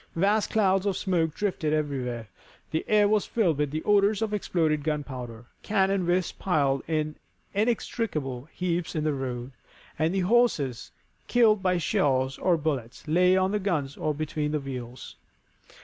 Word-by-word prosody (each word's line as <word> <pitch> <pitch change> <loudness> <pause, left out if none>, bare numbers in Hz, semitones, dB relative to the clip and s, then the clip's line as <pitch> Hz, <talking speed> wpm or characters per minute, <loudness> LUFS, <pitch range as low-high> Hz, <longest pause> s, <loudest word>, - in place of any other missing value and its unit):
Vast 200 +5 +2
clouds 195 -2 +2
of 195 - 0
smoke 165 -5 0
drifted 180 -7 -1
everywhere, 130 -7 -2 0.4
the 160 - -1
air 210 -1 +4
was 210 0 +1
filled 175 -11 +1
with 150 -1 +1
the 155 +3 -4
odors 205 +1 +3
of 215 -1 -2
exploded 160 -7 0
gunpowder, 130 -6 -4 0.2
cannon 195 -3 +1
were 180 +1 +3 0.2
piled 140 -7 +1
in 155 -1 -1 0.4
inextricable 180 - -1
heaps 175 -2 -2
in 155 - 0
the 155 -1 +1
road, 130 -2 -4 0.5
and 165 +5 +1
horses, 180 - +1 0.4
killed 220 -4 +4
by 185 -1 +2
shells 135 -4 +1
or 180 -2 +3
bullets, 140 -7 -3
lay 180 +4 +4
on 190 0 +2
the 210 - 0
guns 155 -9 -1
or 155 - -1
between 150 0 -2
the 150 - +1
wheels. 125 -3 -7
160 Hz, 150 wpm, -27 LUFS, 140-195 Hz, 0.5 s, air